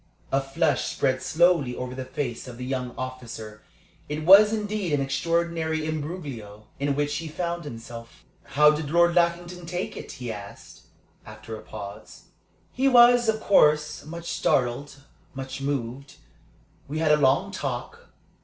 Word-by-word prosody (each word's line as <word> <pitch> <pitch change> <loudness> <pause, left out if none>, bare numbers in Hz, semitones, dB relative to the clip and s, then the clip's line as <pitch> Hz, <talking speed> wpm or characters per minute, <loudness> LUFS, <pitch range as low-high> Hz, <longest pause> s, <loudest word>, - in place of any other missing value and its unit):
A 135 - +2
flush 145 +2 0
spread 130 -1 0
slowly 165 -7 +2
over 125 0 -5
the 130 0 -5
face 130 -2 -4
of 120 -2 -9
the 125 - -6
young 125 -1 -3
officer. 115 -4 -7 0.5
It 150 +1 -3
was 200 +4 +9
indeed 210 -5 -2
an 145 - +2
extraordinary 160 +2 -1
imbroglio 145 - -6
in 140 0 0
which 145 +1 -1
he 165 - -5
found 170 +1 -4
himself. 115 -2 -10 0.2
"How 150 +2 +5
did 150 -1 -3
Lord 170 +2 +4
Lackington 175 0 0
take 180 +2 -4
it?" - - -8
he 125 -2 -5
asked, 100 -2 -11 0.4
after 110 +1 -9
a 110 - -9
pause. 100 -2 -10 0.5
"He 265 +1 +1
was, 240 -2 +6
of 220 0 0
course, 150 -5 +3
much 170 +2 -7
startled, 140 +3 0 0.3
much 135 0 -6
moved. 135 0 -4 0.7
We 150 +3 -4
had 155 -1 +2
a 150 - +6
long 145 +8 +2
talk. 470 - -5
145 Hz, 150 wpm, -25 LUFS, 130-170 Hz, 0.7 s, was